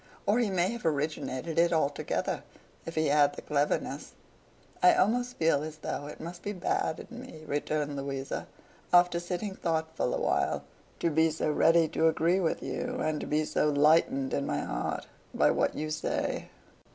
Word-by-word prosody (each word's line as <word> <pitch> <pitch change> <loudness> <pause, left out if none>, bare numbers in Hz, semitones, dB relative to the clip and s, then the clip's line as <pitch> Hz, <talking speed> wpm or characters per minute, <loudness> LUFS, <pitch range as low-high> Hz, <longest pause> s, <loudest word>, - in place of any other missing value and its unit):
Or 210 +4 +3
he 235 -4 +2
may 185 -1 +1
have 235 -1 -6
originated 155 0 -1
it 170 0 +4
altogether, 150 -3 0 0.5
if 165 - -5
he 155 0 +2
had 145 0 +4
the - - -8
cleverness.' 145 0 -1 0.7
'I 180 - +7
almost 245 +5 +1
feel 160 -3 +3
as 155 0 -6
though 145 -1 -4
it 150 - -9
must 175 +2 -7
be 205 - -3
bad 175 -3 -1
in 245 0 -9
me,' 160 -12 -11
returned 145 0 -1
Louisa, 135 -1 -4 0.4
after 175 -1 +5
sitting 180 +3 -3
thoughtful 160 -7 -1
awhile, - - 0 0.4
'to 170 - +2
be 160 +1 +4
so 155 -1 -1
ready 165 +2 +4
to 160 - +2
agree 165 +3 +2
with 170 -4 -1
you, 250 0 -3
and 155 -1 -1
to - - -5
be 155 +1 +1
so 150 - +1
lightened 145 -2 +3
in 140 - -1
my - - -1
heart - - -3 0.3
by - - +4
what - - +1
you 155 +1 -3
say. 155 - -2
160 Hz, 175 wpm, -29 LUFS, 150-175 Hz, 0.7 s, I